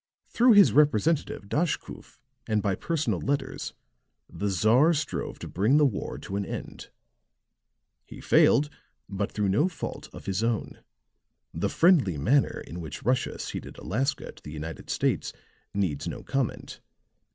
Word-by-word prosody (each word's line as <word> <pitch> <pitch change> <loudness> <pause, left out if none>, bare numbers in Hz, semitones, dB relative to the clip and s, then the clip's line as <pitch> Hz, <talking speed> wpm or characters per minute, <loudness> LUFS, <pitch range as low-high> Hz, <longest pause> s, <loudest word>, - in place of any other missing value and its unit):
Through 245 0 +5
his 205 -2 +7
representative, 150 0 +2
Daschkoof, 160 - -3 0.3
and 105 -2 +1
by 100 - +1
personal 160 - -1
letters, 140 +1 -3 0.5
the 100 - -3
Czar 115 - +4
strove 150 - -3
to - - -8
bring 110 - +2
the 150 - +5
war 125 -8 -2
to 95 - -6
an 100 - -1
end; - - -7 1.2
he - - -11
failed, 150 +1 +4 0.4
but 100 +1 -3
through 105 -2 0
no 110 - +3
fault 185 - -6
of - - -11
his 95 +2 -1
own. 115 -1 -2 0.7
The - - -1
friendly 155 - +4
manner 130 - +2
in 85 +3 -7
which 80 - -7
Russia 125 +2 0
ceded - - -6
Alaska 135 +8 -2
to - - -19
the 75 - -9
United 80 +1 -7
States - - 0 0.4
needs 90 -8 -1
no - - -6
comment. 135 -3 -3
115 Hz, 145 wpm, -27 LUFS, 100-150 Hz, 1.2 s, his